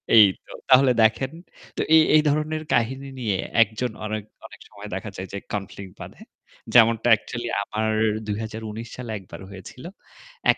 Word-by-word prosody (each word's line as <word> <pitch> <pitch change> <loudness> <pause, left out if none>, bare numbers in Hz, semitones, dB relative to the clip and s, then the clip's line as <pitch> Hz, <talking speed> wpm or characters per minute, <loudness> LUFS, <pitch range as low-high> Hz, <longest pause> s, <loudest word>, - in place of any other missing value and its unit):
এই 110 -2 +10 0.2
তো! - - -15 0.2
তাহলে 130 0 +6
দেখেন। 110 +4 +2 0.5
তো - - 0
এই 160 - +8
এই 155 - +7
ধরনের 155 +1 -1
কাহিনী 130 +4 0
নিয়ে 105 -6 -1 0.2
একজন 115 +2 0
অনেক 105 -1 -3 0.2
অনেক - - -12
সময় 105 +1 -10
দেখা 95 +3 -4
যায় 95 - -6
যে 100 - -3 0.2
কনফ্লিক্ট 100 -2 -6
বাধে। - - -11 0.5
যেমনটা 115 -1 +5
অ্যাকচুয়ালি 120 +2 +1 0.2
আমার 110 +1 -2 0.3
২০১৯ 110 +1 -5
সালে 125 -3 -6
একবার 95 - -12
হয়েছিল। 100 +6 -11 0.7
এক - - -4
110 Hz, 155 wpm, -24 LUFS, 105-125 Hz, 0.7 s, এই